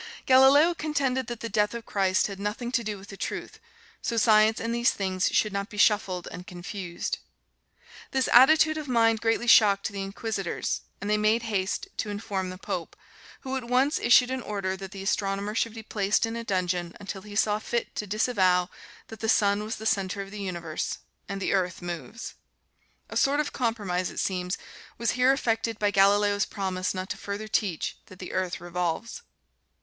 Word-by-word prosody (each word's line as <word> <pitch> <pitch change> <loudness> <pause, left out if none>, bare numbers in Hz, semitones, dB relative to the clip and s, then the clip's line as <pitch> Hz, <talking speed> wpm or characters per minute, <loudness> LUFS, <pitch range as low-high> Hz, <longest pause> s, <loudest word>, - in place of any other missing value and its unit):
Galileo 270 +6 +6
contended 275 -6 -1
that 240 -2 -6
the 230 - -3
death 210 0 +1
of 230 -2 -6
Christ 190 -1 +1
had 200 -2 -5
nothing 210 +4 -3
to 250 -2 +1
do 210 -1 -3
with 195 +1 -13
the 195 - -8
truth, - - -5 0.4
so 230 - -2
Science 215 0 +5
and 230 +1 -2
these 235 0 +3
things 190 -1 0
should 215 -2 +2
not 200 +1 -3
be 210 - -10
shuffled 200 -4 +2
and 180 0 -9
confused. 180 -1 -5 0.9
This 265 -1 +1
attitude 310 +5 +6
of 300 - -7
mind 225 -3 +3
greatly 225 +1 +1
shocked 205 -4 +6
the 200 -2 -5
Inquisitors, 195 -1 -3 0.2
and 200 - -5
they 210 0 +2
made 215 +2 +2
haste 205 - -2
to 210 - -2
inform 200 -2 -3
the 185 - -7
Pope, - - -5 0.5
who 265 -1 -4
at 260 -2 -3
once 255 +5 +2
issued 250 +1 +5
an 260 0 -2
order 195 -4 -3
that 190 0 -8
the 195 -1 -8
astronomer 195 +1 -1
should 230 0 -1
be 225 - -7
placed 205 0 +1
in 225 0 -4
a 235 - -4
dungeon 180 -4 -1
until 195 -1 -6
he 205 +1 -10
saw 210 0 +2
fit 235 +2 -3
to 210 - -3
disavow 190 -4 +2 0.4
that 225 - -9
the 220 - -2
sun 205 -1 +3
was 220 +2 -4
the 220 - -9
center 195 -2 0
of 195 - -12
the 210 0 -6
universe, 170 -5 -3 0.3
and 195 0 -3
the 195 - 0
earth 185 -2 0
moves. 175 - -6 0.8
A - - -6
sort 280 +2 +3
of 300 - -1
compromise, 205 -7 -1
it - - -6
seems, 180 -1 -1 0.4
was 235 - +1
here 250 +2 +4
effected 230 -4 0
by 205 -1 +1
Galileo's 205 +1 +3
promise 190 -2 -2
not 185 +1 -4
to 205 - -4
further 200 +2 -5
teach 200 -6 -1
that 185 - -13
the 185 - -8
earth 185 -2 -1
revolves. 175 - -3
210 Hz, 190 wpm, -27 LUFS, 190-230 Hz, 0.9 s, Galileo